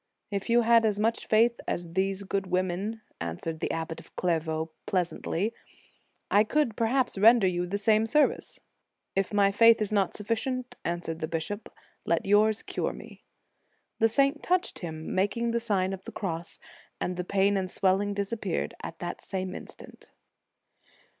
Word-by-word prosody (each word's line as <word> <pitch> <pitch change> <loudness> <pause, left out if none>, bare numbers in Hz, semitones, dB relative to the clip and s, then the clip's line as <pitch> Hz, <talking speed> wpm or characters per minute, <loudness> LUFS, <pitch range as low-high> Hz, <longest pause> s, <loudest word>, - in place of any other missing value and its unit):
" - - -55
If 200 +2 -3
you 240 +1 +5
had 230 0 +5
as 210 -2 +1
much 225 +2 0
faith 230 +2 +3
as 170 -1 -3
these 195 +1 0
good 195 0 -2
women," 185 +4 -1 0.2
answered 85 - -4
the - - -2
Abbot 165 0 -3
of - - -17
Clairvaux, 160 -2 -1 0.2
pleasantly, 185 +2 -1 0.4
" - - -38 0.3
I 205 - +6
could, 245 -1 +1
perhaps, 240 -1 +1
render 225 0 +7
you 180 -1 0
the 200 +3 -1
same 215 +2 +3
service." 300 +6 +1 0.6
"If 195 0 0
my 200 -1 +4
faith 230 +3 +6
is 215 -1 -1
not 200 -3 +1
sufficient," 245 +4 -2
answered 170 -1 -3
the 160 - -2
bishop, 190 +7 -4 0.3
"let 170 - 0
yours 210 +2 +3
cure - - -2
me." - - -12 0.7
The 225 - +4
saint 275 +5 +2
touched 365 0 0
him, 160 -2 -5
making 230 +5 +1
the 235 - +1
Sign 195 -4 0
of 190 0 -8
the - - -7
Cross, 170 -4 -4 0.4
and 180 - -2
the 180 - -3
pain 200 +2 +2
and 190 -1 -1
swelling" 195 +2 +1
disap 200 +3 -3
peared - - -2
at - - -7
the - - -4
same 185 -1 -4
instant. - - -11
200 Hz, 170 wpm, -28 LUFS, 180-225 Hz, 0.7 s, render